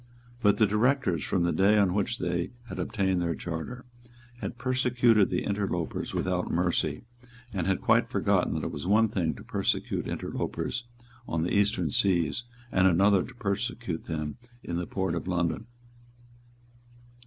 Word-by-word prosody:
But 105 Hz, -3 st, +4 dB
the 110 Hz, -, +5 dB
Directors, 105 Hz, -, +2 dB
from 85 Hz, +7 st, 0 dB
the 85 Hz, -, +2 dB
day 100 Hz, +3 st, +4 dB
on 100 Hz, -3 st, +3 dB
which 105 Hz, +4 st, 0 dB
they 85 Hz, -2 st, -1 dB, 0.2 s
had -, -, -6 dB
obtained 95 Hz, -3 st, 0 dB
their 85 Hz, -1 st, 0 dB
charter, 85 Hz, +10 st, -5 dB, 0.5 s
had 120 Hz, -, -5 dB
persecuted 125 Hz, -4 st, +3 dB
the 90 Hz, -, -1 dB
interlopers 100 Hz, -5 st, -2 dB
without 90 Hz, -1 st, -1 dB
mercy, 85 Hz, -2 st, 0 dB, 0.5 s
and 90 Hz, -3 st, -1 dB
had 95 Hz, -1 st, +1 dB
quite -, -, +3 dB
forgotten -, -, +1 dB
that -, -, -2 dB
it -, -, -2 dB
was 70 Hz, +5 st, -5 dB
one 110 Hz, +3 st, +4 dB
thing 80 Hz, -7 st, -1 dB
to -, -, -11 dB
persecute -, -, -1 dB
interlopers 120 Hz, +1 st, -3 dB, 0.5 s
in 80 Hz, -1 st, 0 dB
the 90 Hz, -, -1 dB
Eastern 100 Hz, -6 st, +2 dB
Seas, 95 Hz, +4 st, +1 dB, 0.3 s
and 95 Hz, 0 st, +4 dB
another 95 Hz, +2 st, +4 dB
to -, -, -11 dB
persecute 105 Hz, -3 st, -3 dB
them 75 Hz, -2 st, -4 dB, 0.3 s
in 85 Hz, -, -3 dB
the 90 Hz, -, -3 dB
port 95 Hz, -3 st, -1 dB
of 85 Hz, +1 st, -3 dB
London. 90 Hz, +5 st, -1 dB
95 Hz, 155 wpm, -28 LUFS, 85-105 Hz, 0.5 s, the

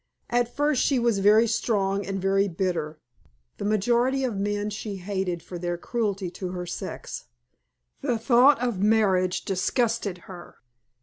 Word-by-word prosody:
At 240 Hz, 0 st, 0 dB
first 290 Hz, -2 st, +2 dB
she 275 Hz, -, +2 dB
was 235 Hz, -4 st, +1 dB
very 210 Hz, +3 st, +5 dB
strong 200 Hz, -3 st, 0 dB
and 195 Hz, 0 st, -2 dB
very 195 Hz, +1 st, +2 dB
bitter. 165 Hz, -4 st, -2 dB, 0.6 s
The -, -, -3 dB
majority 240 Hz, +6 st, +2 dB
of 245 Hz, -5 st, -1 dB
men 205 Hz, +1 st, -2 dB
she 205 Hz, 0 st, -5 dB
hated 190 Hz, -3 st, -3 dB
for 175 Hz, 0 st, -8 dB
their 175 Hz, 0 st, -2 dB
cruelty 200 Hz, -3 st, -2 dB
to 185 Hz, 0 st, -6 dB
her 180 Hz, -1 st, -4 dB
sex. -, -, -6 dB, 0.8 s
The 240 Hz, -, 0 dB
thought 245 Hz, +3 st, +5 dB
of 240 Hz, -6 st, -1 dB
marriage 190 Hz, -4 st, +2 dB
disgusted 215 Hz, +1 st, 0 dB
her. 180 Hz, -2 st, -11 dB
200 Hz, 145 wpm, -25 LUFS, 185-235 Hz, 0.8 s, very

